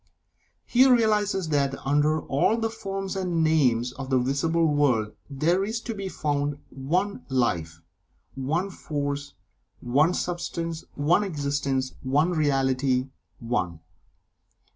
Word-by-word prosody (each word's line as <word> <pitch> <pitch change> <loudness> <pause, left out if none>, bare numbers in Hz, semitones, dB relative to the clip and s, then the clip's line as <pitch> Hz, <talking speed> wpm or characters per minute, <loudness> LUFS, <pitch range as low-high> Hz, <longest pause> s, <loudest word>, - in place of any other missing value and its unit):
He 260 +2 +5
realizes 210 -7 +2
that 140 -2 +1
under 150 +2 +2
all 145 +11 +1
the 225 -1 -1
forms 195 -3 -4
and 180 -4 0
names 125 -7 +2
of 135 +1 -7
the 130 - +3
visible 140 +6 +1
world, 135 -8 +2 0.2
there 165 +7 +1
is 220 +3 -2
to 230 - -4
be 195 -2 -5
found 145 -3 -1
One 180 +10 -1
Life 85 -11 -1 0.5
One 160 +9 -1
Force 145 -3 -4 0.4
One 145 +8 +2
Substance 170 -2 -3
One 160 +8 +3
Existence 140 -6 -1
One 145 +6 +2
Reality 135 -4 +1 0.3
ONE. 90 -9 -2
145 Hz, 120 wpm, -26 LUFS, 135-180 Hz, 0.5 s, He